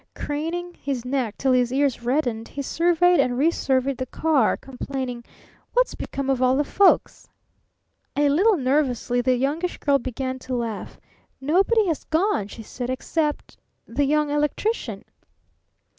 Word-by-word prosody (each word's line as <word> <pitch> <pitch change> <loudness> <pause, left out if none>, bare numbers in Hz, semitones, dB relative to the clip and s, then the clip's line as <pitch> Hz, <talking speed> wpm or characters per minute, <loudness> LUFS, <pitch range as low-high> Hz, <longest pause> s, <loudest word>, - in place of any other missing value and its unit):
Craning 330 +4 -3
his 265 -4 -3
neck 250 -4 -2
till 270 - +1
his 250 -1 +3
ears 270 -2 +1
reddened, 240 -3 -1
he 280 - -5
surveyed 350 +4 +3
and 245 -1 +2
resurveyed 270 -3 +1
the 255 - -4
car, 290 -4 +2
complaining: 260 -2 -5 0.5
"What's - - +2
become 275 -1 -5
of 265 -2 +1
all 255 0 +4
the 290 - +2
folks?" 385 +6 +2 0.9
A 290 0 +3
little 375 +9 +4
nervously 255 -3 +1
the 255 +1 +2
Youngish 295 +8 -1
Girl 280 -1 +2
began 260 +1 -4
to 255 0 -4
laugh. 230 -4 -4 0.4
"Nobody 385 - +3
has 330 -5 -1
gone," 320 - +1
she 225 +2 -10
said, 245 +3 -6
"except 295 +3 -2 0.3
the 275 +5 0
Young 300 +1 +1
Electrician." 295 +10 -1
275 Hz, 145 wpm, -24 LUFS, 255-315 Hz, 0.9 s, all